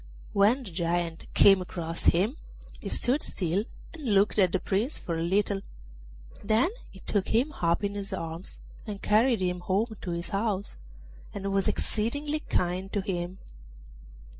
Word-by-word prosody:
When 215 +7 +4
the 200 - -8
Giant 170 0 -1
came 195 -2 +7
across 170 -2 -5
him, 205 - +3 0.4
he - - -5
stood 265 +5 +2
still 185 +3 -1 0.3
and 275 -11 -1
looked 200 +2 +3
at 185 -3 +5
the 190 - +1
Prince 215 - 0
for 170 - -3
a 165 - -1
little; 195 +3 +1 0.8
then 220 - +3 0.2
he 190 - -14
took 205 -3 0
him 245 +7 +2
up 170 +3 +2
in 200 0 0
his 200 0 -4
arms 165 -1 -4 0.3
and 205 -2 -4
carried 225 +1 +3
him 180 -1 0
home 205 +5 0
to 180 - -5
his 170 0 -3
house, 200 - -1 0.6
and 195 -1 -2
was 195 -1 +2
exceedingly 285 +8 -1
kind 185 - -1
to 205 - +1
him. 180 -2 -3
195 Hz, 160 wpm, -28 LUFS, 180-215 Hz, 0.8 s, came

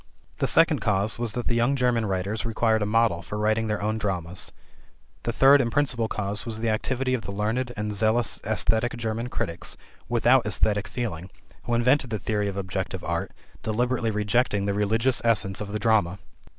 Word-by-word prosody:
The - - +1
second - - +4
cause 100 +3 0
was 120 -3 -1
that 120 - -3
the - - 0
young 120 +4 +2
German 125 -4 +1
writers 95 +3 -2
required 110 -1 +1
a 105 - 0
model 110 -5 +2
for 105 - -6
writing 110 +1 +1
their 105 -1 -2
own 110 +1 -1
dramas. 90 -4 -3 0.7
The - - -2
third 140 +1 +6
and 115 -2 -1
principal 125 -5 +1
cause 105 -1 -3
was 110 -1 -5
the 115 0 0
activity 130 +4 -1
of 125 - 0
the 100 - -7
learned 110 +5 -1
and 105 0 -2
zealous 110 +2 +1
esthetic 110 +2 0
German 115 +1 -3
critics 85 -7 -4 0.3
without 120 0 +3
esthetic 105 +1 0
feeling, 110 -7 -4 0.4
who 120 - 0
invented 125 +2 +2
the 110 - -2
theory 105 +1 -1
of 100 -1 -4
objective 95 -1 -4
art, 85 -1 -2 0.3
deliberately 120 +1 0
rejecting 105 0 +1
the 100 - 0
religious 115 +5 +1
essence 105 -4 +1
of 100 -1 -5
the 105 - -1
drama. 105 -5 +2
110 Hz, 185 wpm, -25 LUFS, 100-120 Hz, 0.7 s, third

